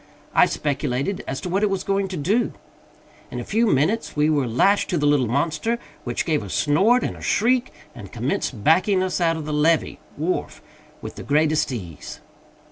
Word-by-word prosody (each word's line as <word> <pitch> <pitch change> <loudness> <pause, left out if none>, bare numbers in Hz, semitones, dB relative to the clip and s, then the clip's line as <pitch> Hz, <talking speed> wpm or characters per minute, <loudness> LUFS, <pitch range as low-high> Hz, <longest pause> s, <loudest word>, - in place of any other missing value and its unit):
I - - +5
speculated 140 +4 -2
as 135 - -3
to 180 - -5
what 190 +3 0
it 210 - +2
was 195 -1 -2
going 195 0 0
to 185 -1 -5
do. 200 +11 0 0.8
In - - -5
a - - -4
few 230 +3 +1
minutes 190 +8 +1
we 150 +1 +2
were 140 -4 +1
lashed 195 - +2
to 180 - 0
the 150 - 0
little 145 -4 +3
monster, 155 - 0 0.3
which 120 -1 -2
gave 155 -6 +1
a 100 - -8
snort 195 - +3
and - - -3
a - - -13
shriek, 245 +3 +1 0.2
and 100 -2 -11
commenced 120 -2 -3
backing 185 +4 +3
us 185 -1 -2
out 165 -1 +2
from 160 -2 -5
the 150 - -3
levee 155 +2 +1 0.2
(wharf) 165 +5 -3 0.4
with - - -7
the - - -7
greatest 155 0 +1
ease. 90 - -7
155 Hz, 195 wpm, -22 LUFS, 140-195 Hz, 0.8 s, I